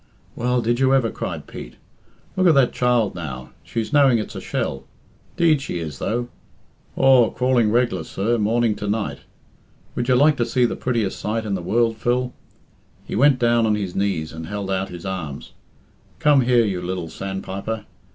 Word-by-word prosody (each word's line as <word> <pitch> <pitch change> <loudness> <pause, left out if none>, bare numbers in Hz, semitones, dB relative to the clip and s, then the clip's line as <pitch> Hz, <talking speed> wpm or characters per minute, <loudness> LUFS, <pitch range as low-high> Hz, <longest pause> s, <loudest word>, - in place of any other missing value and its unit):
"Well, 125 0 0
did 120 +2 +1
you 135 0 +4
ever?" 120 -4 +1
cried - - -5
Pete. - - -9 0.6
"Look 185 -1 +3
at 165 - +5
that 135 -3 +4
child 120 -4 +2
now. 65 -8 -7
She's 115 +4 -4
knowing 140 -4 +5
it's 105 - -4
a - - -6
shell. 65 - -3 0.5
'Deed 160 -5 +3
she 140 - -4
is, 75 -5 -6
though. 120 +2 -1 0.7
Aw, 130 -3 +5
crawling 125 -3 +2
reg'lar, 115 -6 +1
sir, 115 +8 -1
morning 115 +1 +2
to 105 - -4
night. 105 0 -2 0.7
Would 120 - -2
you 125 - +5
like 145 +3 +4
to 120 - +1
see 125 +1 +2
the - - -1
prettiest 115 -6 -1
sight 110 +1 -2
in 105 - -2
the 95 - -2
world, 115 +5 +1
Phil?" 125 +2 0 0.7
He - - -5
went 135 +3 +5
down 120 -2 +3
on 105 - +2
his 100 -4 -3
knees 95 -6 -1
and 80 0 -7
held 100 -1 -4
out 95 0 -1
his 85 0 -9
arms. 85 -8 -5 0.6
"Come 145 -2 +4
here, 120 -2 +3
you 95 -4 -2
lil 90 -1 -4
sandpiper. 95 +4 -5
115 Hz, 180 wpm, -22 LUFS, 95-125 Hz, 0.7 s, at